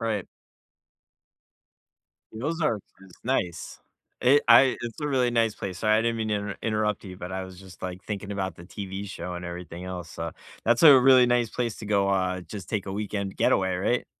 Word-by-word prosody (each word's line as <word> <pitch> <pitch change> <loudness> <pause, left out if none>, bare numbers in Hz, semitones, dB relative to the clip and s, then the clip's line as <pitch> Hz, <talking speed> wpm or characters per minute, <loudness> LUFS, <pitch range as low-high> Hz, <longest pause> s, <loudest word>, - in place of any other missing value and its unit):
Right. 110 -4 -2 2.1
Those 150 +10 -3
are 130 -9 +1 0.2
pris 95 -1 -17
nice. 90 -10 -2 0.4
It 140 +4 +5
I 130 +3 +7
it's 120 +1 -6
a 150 - -1
really 130 -4 +2
nice 115 -2 +2
place. 95 -2 -6
Sorry, 110 0 +3
I - - +3
didn't 115 0 0
mean 110 -1 -2
to 105 - +1
inter 100 -1 -4
interrupt 105 -1 -1
you, 90 -1 -8
but 90 -1 -7
I 95 0 -3
was 95 -1 -11
just, 95 -2 -14
like, 90 0 -5
thinking 100 -1 -5
about 95 -1 -3
the 85 - -12
TV 100 +1 -6
show 90 -1 -6
and 90 0 -6
everything 85 0 -7
else, 90 -3 -6
so 85 0 -5 0.3
that's 120 +1 +3
a 145 -5 +10
really 130 -1 +6
nice 120 -2 +2
place 120 -3 -2
to 110 - -8
go, 100 -1 +2
uh, 95 -1 0
just 95 +1 -9
take 100 -3 -2
a 95 - -4
weekend 100 -1 -3
getaway, 95 -1 +2
right? 120 +6 0
100 Hz, 205 wpm, -26 LUFS, 95-115 Hz, 2.1 s, a